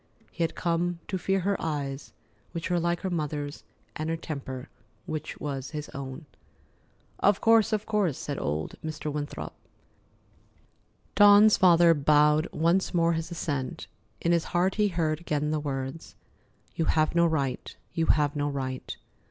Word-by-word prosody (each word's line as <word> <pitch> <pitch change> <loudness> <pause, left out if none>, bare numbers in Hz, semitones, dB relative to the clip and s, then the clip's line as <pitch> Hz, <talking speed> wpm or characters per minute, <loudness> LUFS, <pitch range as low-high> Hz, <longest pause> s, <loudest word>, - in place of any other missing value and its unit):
He - - -7
had 165 - -2
come 175 0 0
to 190 - -1
fear 195 +2 0
her 200 +2 +1
eyes, 145 -3 -3 0.4
which 170 +2 -4
were 175 - +2
like 170 0 0
her 190 - -3
mother's, 150 -3 -3 0.3
and 155 +1 -3
her 165 - -1
temper, 140 -4 -6 0.4
which 155 -1 -5
was 135 -2 -4
his 150 - -6
own. 140 +2 -7 0.9
"Of 205 0 +3
course, 225 -1 +4
of 215 -1 0
course," 205 - 0
said 145 -1 -4
old 75 +1 -2
Mr. 155 -1 -4
Winthrop. 145 -1 -5 1.6
Dawn's 205 +1 +7
father 170 -2 +6
bowed 150 +1 +4
once 170 +4 +1
more 170 0 +3
his 165 0 -3
assent. 145 -6 -3 0.3
In 170 - +1
his 170 -1 +2
heart 180 +2 +1
he 210 -1 +2
heard 160 -4 -1
again 150 -3 -1
the 155 - 0
words: 135 +1 -5 0.6
"You 165 - 0
have 155 0 +2
no 170 0 +4
right. 140 -6 -2 0.2
You 165 -1 0
have 145 -1 +2
no 145 0 0
right!" 130 -2 -4
160 Hz, 155 wpm, -27 LUFS, 145-175 Hz, 1.6 s, Dawn's